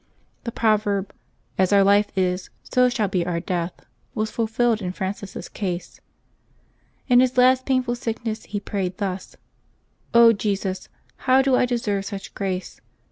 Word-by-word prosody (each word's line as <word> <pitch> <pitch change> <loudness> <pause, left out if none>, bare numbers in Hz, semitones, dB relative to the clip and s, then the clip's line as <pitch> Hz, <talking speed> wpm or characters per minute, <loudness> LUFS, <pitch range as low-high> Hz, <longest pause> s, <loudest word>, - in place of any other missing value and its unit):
The 235 - -2
proverb, 210 -3 +1 0.2
" - - -41
As 185 0 +3
our 200 -1 +6
life 205 +1 +4
is, 180 0 0
so 250 -1 +3
shall 225 -4 0
be 185 -2 0
our 170 -1 -2
death," 175 0 -2 0.4
was 215 0 -1
fulfilled 230 0 +1
in 180 -1 -3
Francis' 195 +1 -5
case. 180 -4 -5 1.1
In 245 -2 +6
his 255 0 +2
last 255 +1 +4
painful 255 -2 +1
sickness 230 -2 -4
he 205 - -4
prayed 190 -2 -3
thus: 190 -2 -4 0.5
" 230 -2 +4
Jesus: 195 -2 -2 0.4
how 260 +1 +6
do 265 -1 +3
I 250 - +3
deserve 210 -5 -1
such 200 -2 -7
grace 190 -2 -4
205 Hz, 150 wpm, -23 LUFS, 190-235 Hz, 1.1 s, our